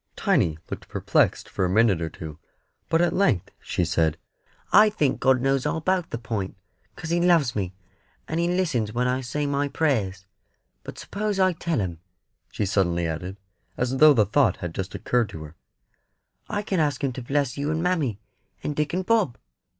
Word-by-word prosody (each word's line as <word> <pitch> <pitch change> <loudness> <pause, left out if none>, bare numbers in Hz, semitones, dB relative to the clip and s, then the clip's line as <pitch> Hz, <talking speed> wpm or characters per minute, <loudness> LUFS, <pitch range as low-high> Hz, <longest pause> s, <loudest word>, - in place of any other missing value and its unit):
Tiny 120 - +1
looked - - -6
perplexed - - +1
for - - -2
a 90 - +1
minute 100 -3 +3
or 80 - -2
two, 80 -1 -9 0.5
but 165 +1 +3
at 170 -1 +1
length 135 - +1
she 90 - -1
said: 80 -1 +1 0.6
"I 210 +2 +8
think 155 -10 0
God 130 -1 +3
knows 135 0 +1
all - - -1
about 180 +1 0
the - - -3
Point, 105 -5 -4 0.4
'cos 160 - -6
He 170 0 +2
loves 170 -8 +3
me, 95 -3 -3 0.5
and 160 - -2
He 170 - +2
listens 155 - 0
when 125 +1 +1
I 130 +1 0
say 140 +4 -2
my 140 0 0
prayers. 105 - -1 0.6
But - - -9
s'pose 210 -1 -3
I 185 -1 +4
tell 165 -1 -2
him," 90 -5 -3 0.5
she 105 - -1
suddenly 85 -3 +1
added, 90 +4 -4 0.4
as 125 +2 -1
though 155 0 +7
the 110 -3 +4
thought 135 +8 +2
had 90 -2 -5
just 95 +2 -5
occurred 120 -4 0
to 80 - -8
her; 75 +1 -11 0.9
"I 205 -1 -2
can 195 -3 -1
ask 145 -3 0
Him 135 -2 0
to 130 - -6
bless 135 0 -1
you 145 +1 -2
and 160 +1 -1
mammy, 155 - 0 0.4
and 150 - -2
Dick 150 +2 -1
and 185 0 -1
Bob. 215 - +2
130 Hz, 190 wpm, -25 LUFS, 100-165 Hz, 0.9 s, I